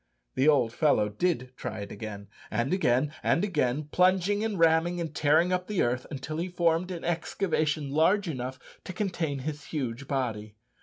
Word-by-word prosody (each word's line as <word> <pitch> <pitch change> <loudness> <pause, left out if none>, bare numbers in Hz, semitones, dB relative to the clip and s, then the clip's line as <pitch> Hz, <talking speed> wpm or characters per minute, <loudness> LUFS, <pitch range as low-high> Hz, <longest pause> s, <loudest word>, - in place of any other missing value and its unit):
The 135 - +2
old 130 -7 +4
fellow 115 -9 +3
did 130 - -1
try 125 -5 -5
it 100 - -7
again, 100 -1 -7 0.2
and 120 +9 0
again, 145 -5 +2
and 170 - +2
again, 150 -7 0
plunging, 185 +3 +3
and 220 -3 -1
ramming, 165 +1 +3
and 165 -3 -4
tearing 155 +5 +3
up 180 0 -1
the 210 -4 +1
earth, 125 +1 -1
until 145 +1 -5
he 170 +3 -1
formed 170 0 +1
an 175 -3 -5
excavation 155 -4 -1
large 180 +7 +3
enough 130 -4 -4 0.3
to 185 - -6
contain 175 -7 -2
his 150 -1 -4
huge 130 -3 -4
body. 110 -7 -3
155 Hz, 170 wpm, -28 LUFS, 125-175 Hz, 0.3 s, old